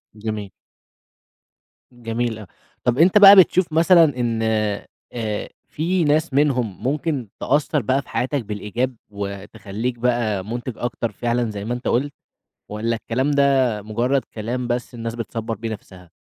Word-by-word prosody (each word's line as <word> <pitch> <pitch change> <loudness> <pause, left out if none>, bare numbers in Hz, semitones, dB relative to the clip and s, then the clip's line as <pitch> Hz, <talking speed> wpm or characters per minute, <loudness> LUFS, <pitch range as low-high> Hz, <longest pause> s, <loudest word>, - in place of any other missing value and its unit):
آه. 105 -2 -5 1.4
جميل 120 -1 -3
أ 105 - -10 0.4
طَب 125 0 +1
أنت 175 +6 +5
بقى 200 -1 +10
بتشوف 185 -3 +4
مثلًا 170 +2 +6 0.2
إن 115 -2 0 0.7
آآ 110 -3 -3 0.2
في 175 +3 0
ناس 155 0 +1
منهم 130 -8 +1
ممكن 145 -2 -1
تأثر 145 +1 +1
بقى 130 +2 +1
في - - -21
حياتك 130 -1 -1
بالإيجاب، 110 +5 -3
وتخلّيك 100 +3 -5
بقى 115 -5 0
مُنتِج 120 +3 -4
أكتر 120 -2 -3
فعلًا 120 +2 -1
زَي 100 -1 -6
ما 120 - -2
أنت 125 +1 -5
قُلت، 140 +4 0 0.6
والّا 110 +2 -1
الكلام 130 +5 -1
ده 135 -6 +2
مجرد 120 +6 0
كلام 120 +3 -3
بس 120 +1 -3
الناس 115 -1 -5
بتصّبر 115 -1 -4
بيه 115 +2 -5
نفسها؟ 95 -5 -10
120 Hz, 140 wpm, -21 LUFS, 110-140 Hz, 1.4 s, بقى